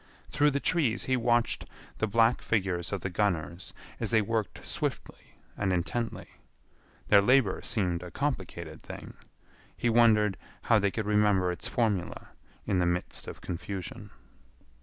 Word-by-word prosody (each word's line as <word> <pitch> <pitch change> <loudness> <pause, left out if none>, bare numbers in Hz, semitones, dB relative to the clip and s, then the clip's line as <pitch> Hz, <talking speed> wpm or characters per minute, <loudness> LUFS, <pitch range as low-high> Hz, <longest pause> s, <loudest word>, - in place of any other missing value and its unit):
Through 145 +1 +4
the 140 0 0
trees 155 - +1
he 130 - +1
watched 120 -1 +1 0.3
the 110 - +1
black 115 +3 +3
figures 95 -5 -1
of 100 -3 -2
the 95 - -2
gunners 85 -3 -1 0.3
as 115 - -1
they 115 - +4
worked 110 -1 -2
swiftly - - -4 0.2
and 100 -2 0
intently. 95 +7 -2 0.8
Their 100 -1 +7
labor 125 -2 +3
seemed 90 -6 -1
a 90 - -7
complicated 90 - -4
thing. - - -9 0.6
He 120 - +1
wondered 110 -4 +4 0.3
how 115 - +4
they 100 0 +2
could 110 +2 -3
remember 105 -3 +3
its 90 +6 -5
formula 110 -7 -1 0.4
in 95 - +1
the 90 - +2
midst 90 +1 -2
of - - -8
confusion. 90 +1 -6
105 Hz, 145 wpm, -29 LUFS, 90-115 Hz, 0.8 s, Their